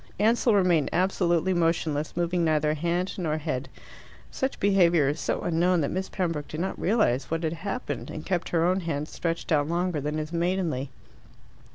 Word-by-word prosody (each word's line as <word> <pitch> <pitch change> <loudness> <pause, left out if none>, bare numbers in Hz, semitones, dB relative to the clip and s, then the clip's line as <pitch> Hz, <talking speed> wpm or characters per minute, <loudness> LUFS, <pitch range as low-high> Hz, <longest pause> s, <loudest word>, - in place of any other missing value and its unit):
Ansell 225 +1 +3
remained 175 -6 +3
absolutely 180 -1 +1
motionless, 165 -3 0
moving 175 0 +1
neither 155 -1 +2
hand 175 +4 -1
nor 155 -3 -1
head. 140 -4 -3 0.6
Such 265 +1 -2
behaviour 175 -7 +4
is 150 +3 -2
so - - -1
unknown 175 +1 +2
that 140 - -1
Miss 190 +1 -3
Pembroke 165 -6 -2
did 155 - -6
not 190 +3 -3
realize 140 - +1
what 165 +1 -2
had 160 0 0
happened, 200 +9 -4
and 155 - -7
kept 180 -3 -1
her 165 -1 +2
own 185 +2 +2
hand 155 -4 -3
stretched 165 +1 -3
out 145 -2 +3
longer 170 -2 -1
than 150 +2 -2
is 155 +2 -4
maidenly. 170 -6 -1
170 Hz, 175 wpm, -26 LUFS, 155-185 Hz, 0.6 s, behaviour